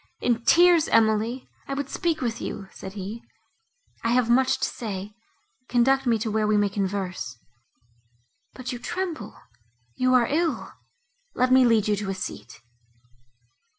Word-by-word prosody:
"In 235 -1 0
tears, 345 0 +6
Emily! 225 +3 +2 0.2
I 275 - -3
would 285 -1 -3
speak 330 +2 -1
with 235 -3 -2
you," 195 -1 -6
said 190 0 -9
he, 205 +3 -6 0.8
"I 230 - +1
have 245 -2 +2
much 260 +2 +3
to - - +2
say; 205 -2 -6 0.6
conduct 260 +2 +3
me 230 -2 +3
to 220 0 -3
where 215 0 +1
we 210 0 +3
may 205 -1 +2
converse. 190 - -3 1.2
But 255 -1 -6
you 245 - -5
tremble—you 235 - -5
are 245 -2 +5
ill! 330 +2 -1 0.6
Let 255 0 +2
me 260 -1 +6
lead 225 -3 +3
you 210 - +2
to 200 -1 -4
a 195 - -2
seat." 120 -11 -7
230 Hz, 150 wpm, -25 LUFS, 200-255 Hz, 1.2 s, tears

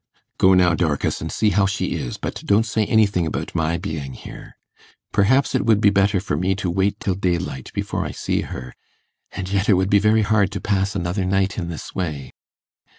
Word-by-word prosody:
'Go 95 0 +6
now, 90 -1 +4
Dorcas, 75 -3 -1
and 80 - -4
see 105 -2 +1
how 100 +1 +3
she 95 - -2
is, - - -4
but - - -5
don't 105 +2 +3
say 110 -2 0
anything 100 -6 +2
about - - -4
my 85 0 0
being 80 -7 -5
here. - - -11 0.5
Perhaps 120 +8 +3
it 130 - +1
would 110 -3 +3
be 105 -1 +4
better 100 0 +2
for 95 -5 -2
me 90 +5 0
to 95 -3 -2
wait 95 +3 0
till 95 - -1
daylight 85 -8 -2
before - - -2
I - - -4
see - - -2
her, 65 0 -7 0.6
and 90 - -5
yet 100 +1 0
it - - +7
would 95 +1 0
be 100 - +6
very 110 +2 +3
hard 105 -2 +2
to - - -3
pass 100 0 -1
another 90 +1 -1
night 95 +2 0
in 85 -3 -4
this 80 - -7
way. 75 -7 -4
95 Hz, 210 wpm, -21 LUFS, 85-100 Hz, 0.6 s, it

